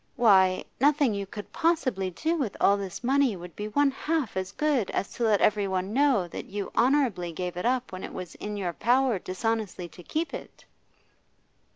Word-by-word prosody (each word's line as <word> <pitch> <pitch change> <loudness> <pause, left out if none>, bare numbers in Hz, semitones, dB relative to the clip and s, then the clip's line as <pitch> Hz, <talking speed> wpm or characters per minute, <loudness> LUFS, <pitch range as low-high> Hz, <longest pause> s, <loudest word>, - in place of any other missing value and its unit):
Why, 190 -6 +4
nothing 285 -3 +3
you 200 -1 -3
could 205 +1 -9
possibly 265 - +1
do 320 - -1
with 265 - -2
all 200 - +5
this 195 +2 -6
money 265 -2 +3
would 175 -1 -10
be 210 - -4
one 285 +6 +2
half 300 -3 -2
as 190 0 -2
good 275 -3 0
as 195 - -2
to 235 - -1
let 210 -3 +3
everyone 195 -2 +1
know 265 -8 +3
that - - -7
you 200 0 -5
honourably 240 -9 +2
gave 180 +2 -4
it 180 +6 -1
up 255 0 0
when 185 0 -7
it - - -6
was 185 -2 -7
in 210 0 -6
your 180 -4 -2
power 245 0 +2
dishonestly 200 -1 -2
to 175 - -13
keep 315 - -3
it! - - -9
210 Hz, 190 wpm, -27 LUFS, 185-265 Hz, -, all